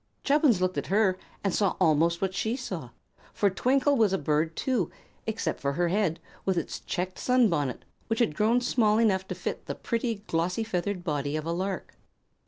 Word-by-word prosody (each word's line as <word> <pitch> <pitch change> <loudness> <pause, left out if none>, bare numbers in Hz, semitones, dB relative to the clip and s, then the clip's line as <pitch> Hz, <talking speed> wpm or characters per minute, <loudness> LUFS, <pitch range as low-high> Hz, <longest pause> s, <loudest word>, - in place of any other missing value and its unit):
Chubbins 285 - +4
looked 185 0 0
at - - -6
her 190 -2 +2 0.2
and 195 -3 +1
saw 200 0 +2
almost 165 +3 +3
what 190 -1 0
she 220 +4 -1
saw; 255 -1 -5 0.4
for 200 -2 +2
Twinkle 270 +8 +2
was 220 -6 +3
a - - +3
bird 155 +1 0
too, 260 -3 0 0.4
except 220 0 -2
for 140 -1 -1
her 175 +3 +1
head, 185 -3 +1 0.2
with 190 -2 0
its 170 - -3
checked 185 0 -4
sunbonnet, 185 - +2 0.2
which 225 - 0
had 230 -9 +2
grown 225 +8 +2
small 220 -4 +3
enough 190 -4 +2
to 185 - -4
fit 180 - -5
the - - -3
pretty, 230 -3 -2
glossy 175 +6 0
feathered 190 -3 -2
body 145 -3 -1
of 155 0 -3
a 165 - -1
lark. 185 +3 -3
190 Hz, 190 wpm, -28 LUFS, 170-225 Hz, 0.4 s, Chubbins